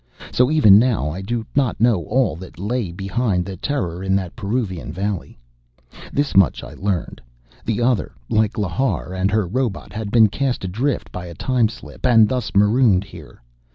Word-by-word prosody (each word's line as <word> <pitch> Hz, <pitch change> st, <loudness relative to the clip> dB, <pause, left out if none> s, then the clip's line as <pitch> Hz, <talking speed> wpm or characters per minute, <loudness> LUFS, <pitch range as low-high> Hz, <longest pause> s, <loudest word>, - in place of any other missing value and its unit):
So, 125 Hz, +1 st, +3 dB
even 125 Hz, -11 st, +7 dB
now 110 Hz, -, +1 dB
I 90 Hz, +5 st, -6 dB
do 115 Hz, +3 st, -3 dB
not 135 Hz, -7 st, +1 dB
know 110 Hz, -8 st, +2 dB
all 125 Hz, -10 st, +1 dB
that 95 Hz, +1 st, -11 dB
lay 105 Hz, 0 st, -2 dB
behind 95 Hz, 0 st, -1 dB
the 95 Hz, 0 st, -6 dB
terror 90 Hz, -, -3 dB
in 95 Hz, 0 st, +1 dB
that 95 Hz, -3 st, -3 dB
Peruvian 100 Hz, -, -3 dB
valley. 95 Hz, -1 st, -4 dB, 0.7 s
This 145 Hz, 0 st, -1 dB
much 95 Hz, -3 st, +4 dB
I -, -, -9 dB
learned: 95 Hz, -4 st, -3 dB, 0.4 s
the 115 Hz, +1 st, -1 dB
Other, 120 Hz, -5 st, +1 dB, 0.2 s
like 110 Hz, 0 st, +1 dB
Lhar 100 Hz, 0 st, -1 dB
and 95 Hz, +1 st, 0 dB
her 105 Hz, -1 st, +1 dB
robot, 110 Hz, -1 st, -3 dB
had 105 Hz, -1 st, -4 dB
been 110 Hz, 0 st, +6 dB
cast 130 Hz, +3 st, -2 dB
adrift 120 Hz, +10 st, -2 dB
by 90 Hz, -1 st, -6 dB
a 85 Hz, -, -9 dB
time 125 Hz, +2 st, +1 dB
slip, -, -, -12 dB
and 115 Hz, -4 st, +6 dB
thus 125 Hz, -3 st, -3 dB
marooned 105 Hz, -1 st, +4 dB
here. 95 Hz, -, -14 dB
105 Hz, 175 wpm, -21 LUFS, 95-120 Hz, 0.7 s, even